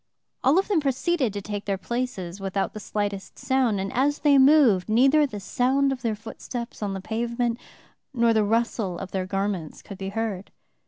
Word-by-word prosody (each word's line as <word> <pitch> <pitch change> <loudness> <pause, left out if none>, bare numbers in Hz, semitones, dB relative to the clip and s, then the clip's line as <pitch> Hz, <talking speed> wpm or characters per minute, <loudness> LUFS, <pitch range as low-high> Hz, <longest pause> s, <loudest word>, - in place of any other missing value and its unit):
All 275 +6 +4
of 385 - +2
them 395 -6 +2
proceeded 280 -1 0
to 200 -1 -5
take 205 0 -5
their 195 -1 -1
places 195 -3 -4
without 195 0 -2
the 215 - -6
slightest 205 -1 -4
sound, 260 -5 +1
and 195 0 -3
as 285 +4 +2
they 285 -2 +4
moved 265 -9 +5
neither 275 +7 +4
the 210 -6 -7
sound 265 +7 +1
of 260 -1 -4
their 230 -3 -1
footsteps 235 +2 -7
on 200 -2 -2
the 190 - -5
pavement, 235 +2 -2 0.5
nor 235 -3 +3
the 220 -1 +3
rustle 220 -4 0
of 195 +1 -7
their 185 -1 -2
garments 195 -4 -3
could 200 - -10
be 195 0 -4
heard. 205 -2 -3
225 Hz, 190 wpm, -25 LUFS, 195-260 Hz, 0.5 s, moved